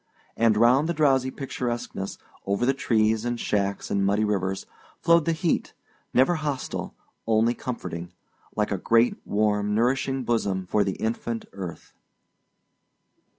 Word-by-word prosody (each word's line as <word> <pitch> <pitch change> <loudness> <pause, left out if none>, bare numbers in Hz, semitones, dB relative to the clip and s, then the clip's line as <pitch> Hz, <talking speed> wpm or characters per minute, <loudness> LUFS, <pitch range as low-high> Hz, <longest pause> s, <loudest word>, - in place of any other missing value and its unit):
And 115 -2 +3
round 125 +8 +4
the 170 - 0
drowsy 135 -4 +3
picturesqueness, 120 -7 -4 0.3
over 100 +5 +1
the 135 - +3
trees 110 -4 +1
and 120 0 -2
shacks 100 -2 -1
and 100 - +1
muddy 100 +2 +2
rivers, 95 -2 -1 0.3
flowed 170 -1 +4
the 165 - +2
heat, 165 +1 0 0.4
never 130 +8 +4
hostile, 145 -4 -4 0.3
only 115 +1 +3
comforting, 90 -10 -5 0.4
like 105 -1 0
a 100 - -1
great 115 +5 +3
warm 105 0 +1
nourishing 130 +3 +1
bosom 100 -6 0
for 105 +3 +2
the 95 - -1
infant 115 +1 -3
earth. 95 -4 -8
115 Hz, 135 wpm, -26 LUFS, 100-130 Hz, 0.4 s, round